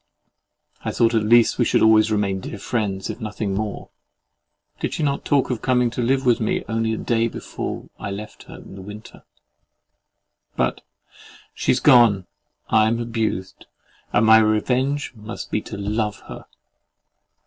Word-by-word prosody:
I -, -, -2 dB
thought 115 Hz, 0 st, +2 dB
at 110 Hz, -, +3 dB
least 115 Hz, +3 st, +4 dB
we 120 Hz, -, +3 dB
should -, -, +2 dB
always 110 Hz, 0 st, +5 dB
remain 100 Hz, -2 st, 0 dB
dear 100 Hz, -, -7 dB
friends, 100 Hz, -3 st, -2 dB
if -, -, -10 dB
nothing 105 Hz, -2 st, -3 dB
more—did 105 Hz, +1 st, -8 dB
she -, -, -2 dB
not 140 Hz, -1 st, -1 dB
talk 140 Hz, -2 st, +1 dB
of 120 Hz, -, -3 dB
coming 125 Hz, -2 st, +2 dB
to 125 Hz, -, -3 dB
live 130 Hz, +2 st, +1 dB
with 120 Hz, -2 st, +3 dB
me 110 Hz, -, -1 dB
only 110 Hz, 0 st, -1 dB
the -, -, -6 dB
day 115 Hz, -1 st, +1 dB
before -, -, -6 dB
I -, -, -5 dB
left 105 Hz, +2 st, -8 dB
her -, -, -11 dB
in -, -, -12 dB
the 95 Hz, -, -9 dB
winter? 105 Hz, +3 st, -11 dB, 1.3 s
But 60 Hz, 0 st, -1 dB, 0.7 s
"she's 125 Hz, -, +1 dB
gone, 120 Hz, -8 st, +5 dB, 0.4 s
I 110 Hz, 0 st, +4 dB
am 115 Hz, +1 st, 0 dB
abused, 110 Hz, -5 st, -3 dB, 0.4 s
and 105 Hz, -, +3 dB
my 110 Hz, 0 st, +8 dB
revenge 125 Hz, +7 st, 0 dB
must 110 Hz, 0 st, -8 dB
be 105 Hz, -, 0 dB
to 105 Hz, -, -8 dB
LOVE 105 Hz, +1 st, -2 dB
her!" -, -, -10 dB
110 Hz, 160 wpm, -22 LUFS, 105-120 Hz, 1.3 s, my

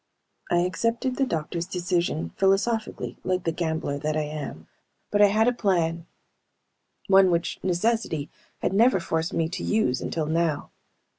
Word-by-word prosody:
I 175 Hz, -, +3 dB
accepted 230 Hz, +8 st, -1 dB
the 270 Hz, -, +2 dB
doctors' 170 Hz, 0 st, -3 dB
decision 175 Hz, -, -1 dB
philosophically, 215 Hz, +3 st, 0 dB
like 185 Hz, -1 st, 0 dB
the 165 Hz, -, 0 dB
gambler 160 Hz, -3 st, -2 dB
that 155 Hz, +1 st, -1 dB
I 155 Hz, -, +1 dB
am. 150 Hz, -, -6 dB, 0.5 s
But 205 Hz, -, +3 dB
I 205 Hz, -, +8 dB
had 215 Hz, +3 st, +3 dB
a 245 Hz, -, +3 dB
plan: 170 Hz, -7 st, 0 dB, 1.0 s
One 190 Hz, -1 st, +6 dB
which 170 Hz, 0 st, -1 dB
necessity 185 Hz, -4 st, 0 dB, 0.3 s
had -, -, +1 dB
never 225 Hz, 0 st, +4 dB
forced 165 Hz, -1 st, -1 dB
me 165 Hz, -, +1 dB
to 180 Hz, -, -5 dB
use 215 Hz, -13 st, +1 dB
until 160 Hz, -2 st, -2 dB
now. 160 Hz, -1 st, 0 dB
175 Hz, 150 wpm, -25 LUFS, 160-205 Hz, 1.0 s, I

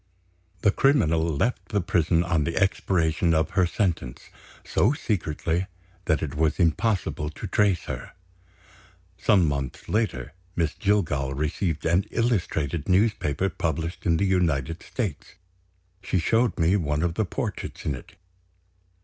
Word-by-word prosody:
The 100 Hz, -, +4 dB
criminal 95 Hz, -, +3 dB
left 80 Hz, -, -1 dB
the 105 Hz, -, +1 dB
prison, 85 Hz, -1 st, +2 dB
on 85 Hz, -3 st, +1 dB
the 85 Hz, +2 st, -2 dB
expiration 85 Hz, -4 st, +2 dB
of 80 Hz, 0 st, +1 dB
her 95 Hz, -2 st, +3 dB
sentence, 85 Hz, -, -2 dB, 0.3 s
so 120 Hz, -, +2 dB
secretly 90 Hz, -, -1 dB, 0.4 s
that 80 Hz, -, +1 dB
it 70 Hz, -3 st, -3 dB
was 80 Hz, +2 st, +1 dB
impossible 90 Hz, -3 st, +1 dB
to 80 Hz, -, -8 dB
trace 100 Hz, -4 st, +2 dB
her. -, -, -6 dB, 1.1 s
Some 95 Hz, -7 st, +4 dB
months 70 Hz, -3 st, -3 dB
later, 80 Hz, -, -1 dB, 0.2 s
Miss 80 Hz, -2 st, 0 dB
Jillgall 80 Hz, -10 st, 0 dB
received 80 Hz, +2 st, -2 dB
an 85 Hz, +4 st, +3 dB
illustrated 85 Hz, -, -1 dB
newspaper 95 Hz, -4 st, +2 dB
published 80 Hz, -1 st, -3 dB
in 85 Hz, -1 st, +4 dB
the 100 Hz, -, +1 dB
United 85 Hz, -4 st, 0 dB
States. 105 Hz, -, -5 dB, 0.7 s
She 95 Hz, -, -1 dB
showed 115 Hz, +7 st, +2 dB
me 85 Hz, +3 st, +3 dB
one 75 Hz, -3 st, -1 dB
of 85 Hz, -1 st, 0 dB
the 110 Hz, -, 0 dB
portraits 90 Hz, -, -5 dB
in 75 Hz, -, 0 dB
it. 65 Hz, -, -10 dB
85 Hz, 135 wpm, -25 LUFS, 80-100 Hz, 1.1 s, The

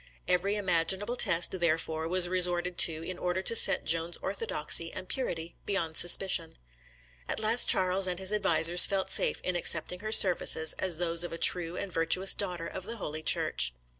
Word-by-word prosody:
Every 180 Hz, +3 st, -2 dB
imaginable 190 Hz, +3 st, -2 dB
test, 170 Hz, -7 st, +1 dB
therefore, 160 Hz, -1 st, -2 dB
was 180 Hz, +1 st, +4 dB
resorted 180 Hz, -1 st, +1 dB
to 160 Hz, -1 st, +4 dB
in 180 Hz, +1 st, -9 dB
order 180 Hz, +1 st, -4 dB
to 230 Hz, -, +1 dB
set -, -, +5 dB
Joan's 165 Hz, +2 st, -2 dB
orthodoxy 180 Hz, -4 st, -2 dB
and 185 Hz, -, -11 dB
purity 170 Hz, -11 st, -6 dB
beyond 170 Hz, -6 st, -4 dB
suspicion. 175 Hz, -1 st, +1 dB, 0.7 s
At -, -, -4 dB
last 220 Hz, +2 st, 0 dB
Charles 185 Hz, +1 st, +2 dB
and 180 Hz, -1 st, -5 dB
his 190 Hz, +2 st, 0 dB
advisers 175 Hz, -4 st, +3 dB
felt 195 Hz, -1 st, -4 dB
safe -, -, +1 dB
in 185 Hz, -, -4 dB
accepting 175 Hz, +1 st, -2 dB
her 215 Hz, +2 st, -8 dB
services 175 Hz, -6 st, +4 dB
as 185 Hz, -4 st, -1 dB
those 170 Hz, 0 st, -1 dB
of 175 Hz, -, -8 dB
a 165 Hz, -, -8 dB
true 175 Hz, 0 st, +1 dB
and 195 Hz, -3 st, -8 dB
virtuous 165 Hz, +4 st, +2 dB
daughter 180 Hz, -4 st, -6 dB
of 185 Hz, +2 st, -9 dB
the 230 Hz, +2 st, -9 dB
Holy 155 Hz, -6 st, -8 dB
Church. -, -, -1 dB
180 Hz, 175 wpm, -27 LUFS, 165-190 Hz, 0.7 s, set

